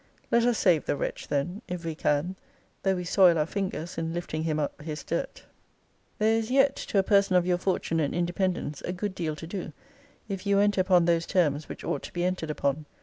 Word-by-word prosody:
Let 235 0 +4
us 240 -2 +2
save 170 -5 +3
the - - 0
wretch - - -4
then, 160 +9 -2
if 180 -2 -5
we 165 - -2
can, 155 +4 0 0.5
though 195 -1 +2
we 180 - -3
soil 175 -1 +5
our 150 - +2
fingers 185 -2 -4
in 165 0 -3
lifting 175 -2 -3
him 155 -2 0
up 150 0 -3
his 155 0 -5
dirt. - - -3 0.7
There 220 +1 +3
is 225 0 -4
yet, 270 +1 +4
to - - -3
a 195 - +5
person 200 -1 +3
of 180 -1 +4
your 180 -1 +1
fortune 180 -3 0
and 145 -3 +1
independence, 175 -3 -1
a 180 - -3
good 190 +2 -3
deal 160 -4 -3
to 165 - -8
do, 175 -2 -5 0.5
if 195 -1 -5
you 200 0 +4
enter 205 -1 +3
upon 180 -2 +4
those 170 -1 +2
terms 155 -5 +1
which - - -8
ought 140 - -2
to - - -9
be 175 - -1
entered 180 -3 -2
upon. 145 0 -1
175 Hz, 220 wpm, -27 LUFS, 160-195 Hz, 0.7 s, soil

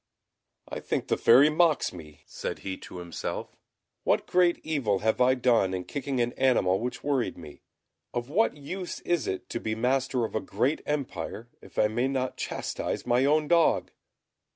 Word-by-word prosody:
"I - - -5
think - - -3
the - - +3
Fairy 135 +6 +6
mocks 160 -1 +2
me," 75 -4 -12
said - - -5
he 95 -1 -2
to - - -10
himself. 85 -2 -5 0.5
"What - - +2
great 180 -1 +3
evil 135 -11 0
have 110 +3 +2
I 130 +1 +5
done 115 -7 +2
in 90 - -3
kicking 140 +3 -3
an 120 0 +1
animal 95 -8 +2
which 125 +2 -4
worried 140 -4 0
me? 75 -4 -11 0.5
Of 120 0 -3
what 175 +3 +1
use 180 +6 -6
is 175 -2 0
it 95 - -3
to - - -3
be 110 -1 -2
master 125 +1 +1
of - - -7
a 110 - 0
great 130 +9 0
empire 135 -5 -3
if - - -16
I 105 - +4
may 120 +4 0
not 130 -1 -2
chastise - - -3
my 125 +2 +3
own 150 +1 +3
dog?" 170 -1 +3
125 Hz, 175 wpm, -28 LUFS, 110-145 Hz, 0.5 s, Fairy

